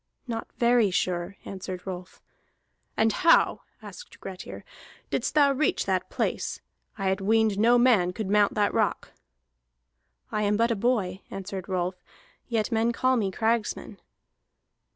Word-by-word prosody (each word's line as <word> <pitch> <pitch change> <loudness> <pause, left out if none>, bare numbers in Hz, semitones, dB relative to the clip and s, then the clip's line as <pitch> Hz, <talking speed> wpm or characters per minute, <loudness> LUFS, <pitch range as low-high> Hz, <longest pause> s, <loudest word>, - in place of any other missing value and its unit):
"Not 230 -3 -4
very 235 -3 +4
sure," 180 +1 -1
answered 185 -1 -7
Rolf. 185 -1 -8 0.7
"And 220 -1 +3
how," 330 - +4 0.2
asked - - -11
Grettir, 190 -1 -8 0.5
"didst - - -1
thou 285 -2 +5
reach 285 +3 0
that - - -1
place? - - -2 0.4
I 195 - -3
had 190 +1 -1
weened 215 0 +2
no 235 +3 +5
man 230 -8 +4
could 210 +2 -4
mount 205 +1 +3
that 205 -1 +1
rock." - - 0 1.2
"I 210 - -1
am 205 0 +2
but 230 +1 +2
a - - +1
boy," 200 -4 0
answered 195 -1 -6
Rolf, 180 0 -2 0.4
"yet 230 -1 -1
men 225 +1 +2
call 255 +2 +2
me 210 -5 0
Cragsman." 225 +3 -1
210 Hz, 140 wpm, -26 LUFS, 190-235 Hz, 1.2 s, thou